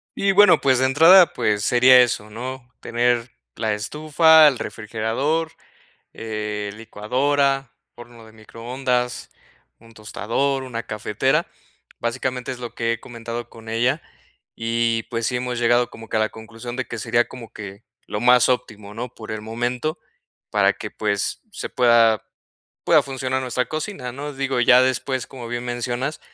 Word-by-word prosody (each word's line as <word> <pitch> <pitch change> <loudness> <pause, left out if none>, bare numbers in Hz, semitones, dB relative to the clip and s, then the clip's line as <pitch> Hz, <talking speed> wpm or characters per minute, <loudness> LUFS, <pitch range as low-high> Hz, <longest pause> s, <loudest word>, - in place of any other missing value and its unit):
Y, 195 0 +2
bueno, 205 +2 +6
pues, 130 -2 +2
de 130 - +3
entrada, 165 +7 +7
pues 105 -1 0
sería 125 +2 +6
eso, 105 -3 -1
¿no?, 125 +3 -7
tener 120 0 0 0.2
la 110 -1 -1
estufa, 155 +8 +5
el 140 -4 +2
refrigerador, 115 +11 -2 0.6
eh, 105 -2 -4
licuadora, 135 +5 0 0.2
horno 120 -1 -13
de 110 - -16
microondas, 125 +3 -3 0.5
un 115 0 -18
tostador, 120 +6 -2
una 120 -3 -5
cafetera. 120 +9 -1 0.5
Básicamente, 125 +1 -3
es 125 - -7
lo 120 -1 -7
que 115 0 -1
he 115 - -6
comentado 120 0 -7
con 115 0 -12
ella 120 +7 0 0.5
y, 115 0 0
pues, 115 -1 -3
sí 125 - -1
hemos 125 -1 -3
llegado 120 +1 +2
como 115 - -12
que - - 0
a - - +1
la 110 - +1
conclusión 115 +2 -9
de 130 0 -3
que 120 - -6
sería 120 +2 +1
como 120 -3 -11
que 100 -1 -9 0.2
lo 105 - -3
más 125 +2 +5
óptimo, 105 -5 -3
¿no?, 120 +2 -5
por 110 0 -9
el 110 - -4
momento, 120 +8 -3 0.5
para - - +3
que, - - -7
pues, 100 -2 -2
se - - -6
pueda 115 -3 +4 0.6
pueda - - +5
funcionar 130 -1 -3
nuestra 125 0 -1
cocina, 155 -5 -5
¿no?, 145 +3 -6
digo, 135 -2 -1
ya 125 +1 +6
después, 130 0 -1
como 125 -3 -9
bien 120 +1 -4
mencionas, 120 +4 -3
120 Hz, 155 wpm, -22 LUFS, 115-130 Hz, 0.6 s, entrada